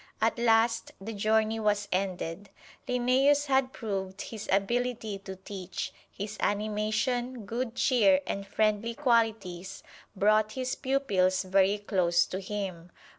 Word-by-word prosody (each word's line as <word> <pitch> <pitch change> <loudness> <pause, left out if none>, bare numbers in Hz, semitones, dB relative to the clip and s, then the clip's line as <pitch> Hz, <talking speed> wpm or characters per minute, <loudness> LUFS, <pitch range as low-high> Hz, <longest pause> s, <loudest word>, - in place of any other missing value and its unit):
At 225 +2 +1
last 230 0 +2
the 215 +4 -6
journey 220 +1 +1
was 205 -1 +1
ended. 185 0 -2 0.4
Linnæus 260 +4 +3
had 265 -2 +2
proved 195 -5 -4
his 220 -2 -8
ability 220 +1 0
to 190 -1 -8
teach 190 -1 -6 0.2
his 205 +2 -6
animation, 215 +3 -1
good 235 +2 -3
cheer 205 -9 +4
and 195 +1 -4
friendly 215 +2 0
qualities 225 -8 0 0.3
brought 215 +2 +3
his 255 0 -2
pupils 205 -10 +1
very 195 +2 +3
close 185 -4 +2
to 185 - -5
him. 190 -4 -5
215 Hz, 125 wpm, -29 LUFS, 195-235 Hz, 0.4 s, cheer